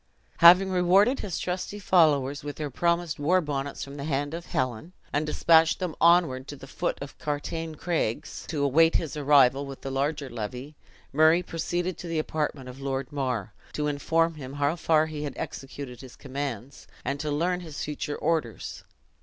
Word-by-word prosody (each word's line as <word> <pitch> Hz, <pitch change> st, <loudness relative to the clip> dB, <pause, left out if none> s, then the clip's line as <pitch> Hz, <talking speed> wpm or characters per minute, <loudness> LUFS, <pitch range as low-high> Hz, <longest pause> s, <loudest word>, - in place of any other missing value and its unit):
Having 180 Hz, +3 st, +8 dB
rewarded 190 Hz, +8 st, +4 dB
his 185 Hz, -5 st, -4 dB
trusty 185 Hz, +3 st, -3 dB
followers 150 Hz, -8 st, +3 dB
with 145 Hz, -1 st, -5 dB
their 150 Hz, -2 st, -4 dB
promised 170 Hz, +2 st, 0 dB
war 175 Hz, +6 st, +3 dB
bonnets 140 Hz, -4 st, -3 dB
from 140 Hz, +1 st, -9 dB
the 140 Hz, -, -5 dB
hand 145 Hz, 0 st, -1 dB
of 170 Hz, +1 st, -6 dB
Helen, 130 Hz, +6 st, -2 dB, 0.2 s
and 150 Hz, +1 st, 0 dB
dispatched 160 Hz, +1 st, +4 dB
them 180 Hz, -4 st, -3 dB
onward 165 Hz, -7 st, +4 dB
to 145 Hz, -, -7 dB
the 135 Hz, -, -11 dB
foot 135 Hz, -, -2 dB
of 140 Hz, -, -11 dB
Cartiane 155 Hz, +2 st, -3 dB
Craigs, 155 Hz, -6 st, -2 dB
to 150 Hz, -3 st, -2 dB
await 160 Hz, +4 st, +4 dB
his 160 Hz, -4 st, -1 dB
arrival 140 Hz, -2 st, +4 dB
with 135 Hz, -1 st, -9 dB
the 135 Hz, -, -5 dB
larger 140 Hz, +1 st, -1 dB
levy. 125 Hz, +5 st, -6 dB, 0.4 s
Murray 160 Hz, +4 st, +5 dB
proceeded 175 Hz, +2 st, -3 dB
to 175 Hz, -, -7 dB
the 165 Hz, -1 st, -2 dB
apartment 150 Hz, -4 st, -2 dB
of 125 Hz, +1 st, -9 dB
Lord 135 Hz, 0 st, -3 dB
Mar, 125 Hz, -8 st, -2 dB, 0.2 s
to 150 Hz, -, -2 dB
inform 165 Hz, +3 st, +1 dB
him 135 Hz, -4 st, -8 dB
how 145 Hz, +2 st, 0 dB
far 160 Hz, -2 st, +3 dB
he 155 Hz, -2 st, -6 dB
had 145 Hz, -1 st, -4 dB
executed 135 Hz, -2 st, -7 dB
his 130 Hz, -2 st, -12 dB
commands, 135 Hz, -2 st, -6 dB, 0.2 s
and 140 Hz, -, -2 dB
to 150 Hz, -, -3 dB
learn 175 Hz, +5 st, 0 dB
his 160 Hz, -4 st, -6 dB
future 150 Hz, 0 st, -4 dB
orders. 155 Hz, -8 st, -2 dB
150 Hz, 180 wpm, -27 LUFS, 135-165 Hz, 0.4 s, Having